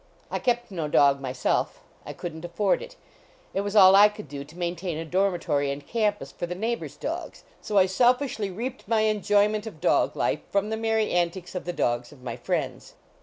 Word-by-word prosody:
I - - -1
kept 240 -2 0
no 165 -5 -3
dog 140 -2 +4
myself; 130 -1 -1 0.3
I - - -5
couldn 160 -2 -7
t 175 - -5
afford 190 +3 +1
it; - - -10 0.6
it 195 - 0
was 205 +1 -4
all 190 -2 +8
I 205 +1 +8
could 210 -7 -10
do 140 0 -6
to 150 +4 -16
maintain 175 -1 -3
a 165 - -4
dormitory 175 -5 0
and 140 +1 -5
campus 210 0 -1
for 175 - -5
the 180 - -4
neighbors 230 +5 -3
dogs, - - -5 0.2
so 210 - -2
I 190 - +7
self 245 +7 +4
fishly 225 -8 -3
reaped 240 +6 -6
my 220 0 +2
enjoyment 210 0 +2
of 170 -8 -9
dog 175 - +2
life - - 0
from 200 +2 0
the - - 0
merry 220 -1 0
antics 175 +1 -1
of 180 - -5
the 175 - -2
dogs 120 -5 -1
of 135 -4 -16
my 120 -2 -4
friends. - - -3
190 Hz, 210 wpm, -26 LUFS, 160-215 Hz, 0.6 s, all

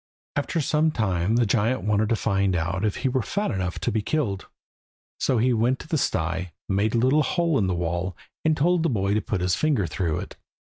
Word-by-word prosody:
After 145 +3 -1
some 155 +2 +2
time 100 - 0
the 120 0 +3
giant 115 +4 +1
wanted 105 0 +1
to 115 - +3
find 100 -3 +1
out 90 +4 -1
if 105 -2 +1
he - - +5
were 130 0 +1
fat 205 - -2
enough 95 -4 -2
to - - 0
be 110 - 0
killed. 105 -6 -2 0.7
So 130 - +1
he 125 +3 +3
went 120 +3 +2
to - - -11
the 160 - -1
sty, 90 -4 -1
made 100 +3 +1
a - - +3
little 130 +6 +4
hole 170 -2 +1
in 100 - +1
the 90 - 0
wall, 85 +1 -2 0.3
and 155 -1 +2
told 175 +3 +3
the 165 - +1
boy 100 -5 0
to 105 - +1
put 100 -4 -2
his 90 0 +1
finger 140 -6 +1
through 85 0 -1
it. - - -9
110 Hz, 225 wpm, -25 LUFS, 95-135 Hz, 0.7 s, he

